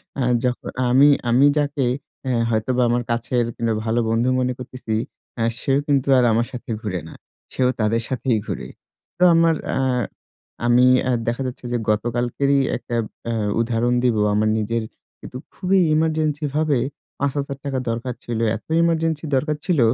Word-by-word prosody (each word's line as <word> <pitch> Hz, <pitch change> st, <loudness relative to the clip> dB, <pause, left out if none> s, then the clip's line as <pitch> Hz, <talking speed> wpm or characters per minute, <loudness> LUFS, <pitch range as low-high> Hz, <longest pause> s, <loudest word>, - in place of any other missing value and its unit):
অ্যা 135 Hz, -, -1 dB, 0.2 s
যখন 125 Hz, -1 st, -2 dB, 0.2 s
আমি 135 Hz, +4 st, +6 dB, 0.2 s
আমি 125 Hz, +4 st, +5 dB
যাকে 145 Hz, -2 st, 0 dB, 0.4 s
অ্যা 130 Hz, -, 0 dB, 0.2 s
হয়তোবা 120 Hz, +3 st, 0 dB
আমার 120 Hz, +1 st, +1 dB
কাছের, 120 Hz, +1 st, 0 dB
কিংবা 115 Hz, -1 st, 0 dB
ভালো 115 Hz, +1 st, +1 dB
বন্ধু 115 Hz, +3 st, +1 dB
মনে 125 Hz, 0 st, 0 dB
করতেছি, 125 Hz, -3 st, -5 dB, 0.4 s
অ্যা 115 Hz, -, +1 dB
সেও 135 Hz, +1 st, +1 dB
কিন্তু 140 Hz, -2 st, +1 dB
আর 125 Hz, -, +4 dB
আমার 115 Hz, +2 st, +1 dB
সাথে 125 Hz, -1 st, -9 dB
ঘুরে 95 Hz, -5 st, -3 dB
না। -, -, -11 dB, 0.4 s
সেও 125 Hz, -1 st, +2 dB
তাদের 110 Hz, +1 st, +1 dB
সাথেই 125 Hz, -2 st, 0 dB
ঘুরে। -, -, -5 dB, 0.5 s
তো 180 Hz, -, +2 dB
আমার 165 Hz, -1 st, +4 dB, 0.2 s
আ -, -, +1 dB, 0.9 s
আমি 120 Hz, +1 st, +5 dB, 0.2 s
অ্যা 130 Hz, -, 0 dB
দেখা 120 Hz, +3 st, -1 dB
যাচ্ছে 125 Hz, 0 st, -8 dB
যে, 120 Hz, -, +1 dB
গতকালকেরই 120 Hz, +5 st, +1 dB, 0.2 s
একটা 120 Hz, -, -6 dB, 0.4 s
আ -, -, -1 dB, 0.3 s
উদাহরণ 120 Hz, +1 st, 0 dB
দিব। 125 Hz, -3 st, +3 dB, 0.2 s
আমার 110 Hz, +1 st, +2 dB
নিজের 115 Hz, +1 st, -1 dB, 0.4 s
কিন্তু 125 Hz, -, -9 dB, 0.2 s
খুবই 190 Hz, 0 st, +1 dB, 0.2 s
ইমার্জেন্সি 155 Hz, -1 st, 0 dB
ভাবে, 155 Hz, -4 st, +2 dB, 0.4 s
৫০০০ 140 Hz, 0 st, -2 dB
টাকা 135 Hz, -2 st, -1 dB
দরকার 120 Hz, +2 st, -3 dB
ছিল। 120 Hz, -2 st, -3 dB, 0.2 s
এত 110 Hz, -, -10 dB, 0.2 s
ইমার্জেন্সি 165 Hz, -2 st, 0 dB
দরকার 150 Hz, +3 st, 0 dB
ছিল, 175 Hz, -5 st, +1 dB
125 Hz, 160 wpm, -21 LUFS, 115-140 Hz, 0.9 s, আমি